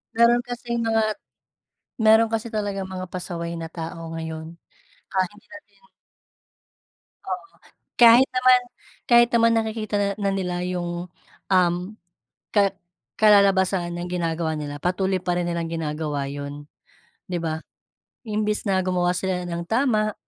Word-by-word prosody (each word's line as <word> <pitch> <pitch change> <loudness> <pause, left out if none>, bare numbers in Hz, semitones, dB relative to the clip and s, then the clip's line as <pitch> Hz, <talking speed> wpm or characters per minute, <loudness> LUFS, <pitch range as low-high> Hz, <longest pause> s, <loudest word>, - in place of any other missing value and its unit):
Meron 235 +1 +5
kasing 240 -1 -3
mga, 225 -1 +2 1.0
meron 220 +1 +6
kasi 225 +1 -1
talagang 200 -2 -2
mga 185 0 -5
pasaway 170 -2 -4
na 165 -1 -5
tao 165 0 -6
ngayon 160 0 -6 0.5
kahit 185 -2 0
hindi 210 +3 -20
natin 305 -1 -14 1.5
Oo, - - -4 0.5
kahit 240 +2 +8
naman 255 0 +5 0.5
kahit 240 0 +6
naman 230 0 +4
nakikita 220 -1 -2
nil 200 0 +1
na 200 - +1
nila 180 -2 -2
yung, 175 0 -3 0.4
um, 180 -2 +4 0.8
ka 200 -2 +4 0.5
kalalabasan 195 -4 +4
ng 175 +1 -5
ginagawa 165 -2 -1
nila 145 -1 -5
patuloy 190 +1 0
pa 180 -1 -1
rin 175 -1 -1
nilang 170 -1 -2
ginagawa 150 -3 -3
yun, 145 +1 -7 0.6
'di 175 - -1
ba? 160 -1 -3 0.6
Imbes 210 0 -1
na 190 -1 +2
gumawa 180 -1 +1
sila 185 -1 -1
ng 170 0 -4
tama 215 -2 +1
185 Hz, 130 wpm, -24 LUFS, 170-215 Hz, 1.5 s, kahit